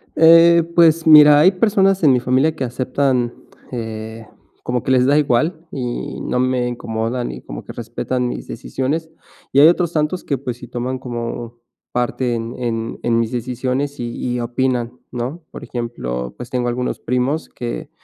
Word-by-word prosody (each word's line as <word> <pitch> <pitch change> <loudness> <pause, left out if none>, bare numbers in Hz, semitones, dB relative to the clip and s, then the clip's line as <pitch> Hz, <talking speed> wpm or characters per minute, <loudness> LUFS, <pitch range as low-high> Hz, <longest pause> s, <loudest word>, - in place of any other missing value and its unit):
Eh, 165 +1 +7
pues 165 -1 +4
mira, 150 -1 +9
hay 185 +5 +6
personas 195 -2 +2
en 140 -3 +6
mi 125 - +3
familia 130 +6 +1
que 135 - -3
aceptan, 130 0 0 0.4
eh, 110 -1 -6 0.4
como 125 -1 -2
que 130 - -1
les 125 -1 +4
da 145 +2 +4
igual 155 +4 +1
y 125 -2 -4
no 125 - -1
me 130 -1 +1
incomodan, 115 - -3
y - - -9
como - - -8
que - - -10
respetan 125 -1 -3
mis - - -6
decisiones. 145 +7 -3 0.4
Y 140 - +4
hay 150 - +9
otros 175 -1 +2
tantos 155 +4 -1
que, 140 - -1
pues 125 -2 -5
sí, 125 - -11
toman 125 +1 -4
como 120 -1 -6 0.3
parte 125 0 -1
en 115 0 -4
en 115 -1 -3
en 115 -1 +2
mis 115 0 -1
decisiones 130 +3 -3
y 120 +1 -3
y - - -2
opinan, 125 0 -1
¿no? 130 +8 -5
Por - - -9
ejemplo, 60 - -4
pues 125 0 -8
tengo 125 -1 -1
algunos 125 +1 -2
primos 125 +6 -1
que, 120 -1 -6
125 Hz, 175 wpm, -19 LUFS, 120-150 Hz, 0.4 s, mira